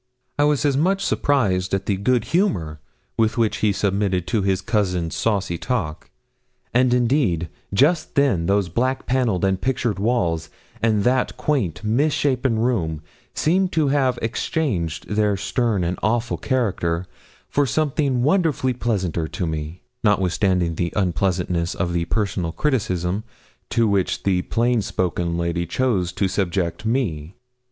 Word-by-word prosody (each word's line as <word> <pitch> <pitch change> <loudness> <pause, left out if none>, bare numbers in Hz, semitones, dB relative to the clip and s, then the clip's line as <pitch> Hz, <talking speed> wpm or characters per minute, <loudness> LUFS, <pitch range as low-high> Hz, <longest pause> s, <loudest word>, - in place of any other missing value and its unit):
I 145 - +5
was 150 -1 +2
as 140 -2 +2
much 190 +7 +1
surprised 95 -10 +1
at 95 - -3
the 100 - +1
good 115 +4 +1
humour 85 - +1 0.4
with 115 +1 +1
which 115 -2 +1
he 105 - +2
submitted 100 -2 0
to 105 +3 0
his 95 -1 +1
cousin's 90 -7 -1
saucy 100 -6 0
talk; 95 -12 -3 0.6
and, 125 +1 +4
indeed, 120 - +1 0.2
just 145 - +2
then 120 -13 +2
those 100 -1 +2
black 130 +9 -1
panelled 120 -8 +1
and 95 -1 0
pictured 120 -5 -1
walls, 85 -8 0 0.3
and 110 -3 +2
that 125 +2 +1
quaint, 115 - -1
misshapen 130 0 +1
room, 90 -10 0 0.3
seemed 185 +4 +2
to 155 -3 +2
have 135 -3 +2
exchanged 110 - -2
their 105 -1 +1
stern 110 -2 0
and 85 +2 -2
awful 115 +3 0
character 95 -9 0 0.4
for 145 -1 +1
something 140 -2 0
wonderfully 145 -5 +2
pleasanter 95 -9 -1
to 90 - -3
me, 80 +1 -5 0.2
notwithstanding 95 -3 +2
the 85 +1 -2
unpleasantness 90 -2 0
of 85 -3 -1
the 85 -1 0
personal 95 -3 -1
criticism 100 - -1 0.5
to 115 -2 +2
which 100 -3 0
the 95 -2 +2
plain 120 +3 +1
spoken 85 -3 -1
lady 85 0 -1
chose 95 -3 0
to 95 +2 0
subject 95 +1 -1
me. 95 - -1
105 Hz, 140 wpm, -22 LUFS, 90-125 Hz, 0.6 s, I